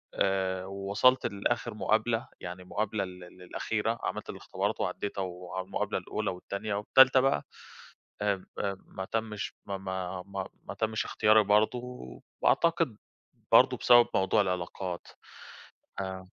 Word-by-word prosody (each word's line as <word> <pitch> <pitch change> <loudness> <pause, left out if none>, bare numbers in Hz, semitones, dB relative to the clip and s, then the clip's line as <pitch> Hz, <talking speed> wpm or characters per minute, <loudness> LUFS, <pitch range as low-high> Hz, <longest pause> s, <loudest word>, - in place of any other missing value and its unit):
آآ، 95 -1 0
ووصَلت 100 +6 +2
لآخِر 115 +3 -1
مقابلة، 110 +2 +1
يعني 90 +1 -7
للمقابلة 105 +2 -2
ال 90 -1 -10
ال 90 +1 -16
الأخيرة، 115 +5 -2
عملت - - -3
الإختبارات - - -3
وعدّيتها 100 -1 -2
والمقابلة 90 0 -3
الأولى - - -3
والتانية 100 +3 -4
والتالتة 130 +6 +6
بقى 130 - +2 0.8
آآ، 100 -1 +2
ب 95 - -16 0.2
آآ، 100 -1 0
ب 95 - -20
ما 95 - -6
تمّش، 110 -1 -3
ما 100 -1 -3
ما 95 -1 -4
ما 100 -1 -5 0.2
ما - - -6
تمّش 110 0 -1
إختياري 110 0 +4
برضه 105 +4 +3 0.6
وأعتقد 165 - +3 0.6
برضه - - +7
بسبب 120 -1 +7
موضوع 95 +2 +3
العلاقات. 90 -1 -3 0.9
آآ 95 -1 -5
100 Hz, 130 wpm, -29 LUFS, 95-110 Hz, 0.9 s, برضه